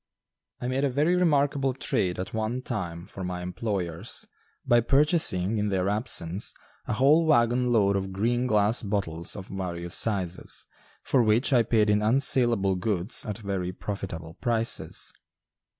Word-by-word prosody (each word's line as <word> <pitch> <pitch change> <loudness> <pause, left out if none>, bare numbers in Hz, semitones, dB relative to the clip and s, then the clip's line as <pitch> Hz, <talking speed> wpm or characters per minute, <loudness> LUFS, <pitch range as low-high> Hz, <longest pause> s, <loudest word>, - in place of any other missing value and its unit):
I 125 - -4
made 130 +2 -1
a 140 - +2
very 150 +7 +2
remarkable 145 -6 +2
trade 90 -8 -1
at 95 - -5
one 110 +3 -2
time 85 -9 -4
for 95 - -8
my 90 0 -4
employers 90 -3 -3 0.4
by 120 0 +4
purchasing, 120 - +2
in 105 0 0
their 95 -1 0
absence, 100 -4 0 0.3
a - - -1
whole 140 +8 +4
wagon 125 -3 +3
load 100 -4 +3
of 95 0 -2
green 120 +6 0
glass 105 +1 +2
bottles 95 -6 -2
of 95 -3 -8
various 85 -2 -4
sizes, 95 -5 -1 0.4
for 130 - +3
which 115 +5 +2
I 120 - +6
paid 110 -1 +2
in 105 0 +3
unsalable 115 -4 +2
goods 95 +3 -1
at 105 -2 -3
very 95 -4 -3
profitable 90 -5 -6
prices. 115 -2 0
105 Hz, 150 wpm, -27 LUFS, 95-125 Hz, 0.4 s, I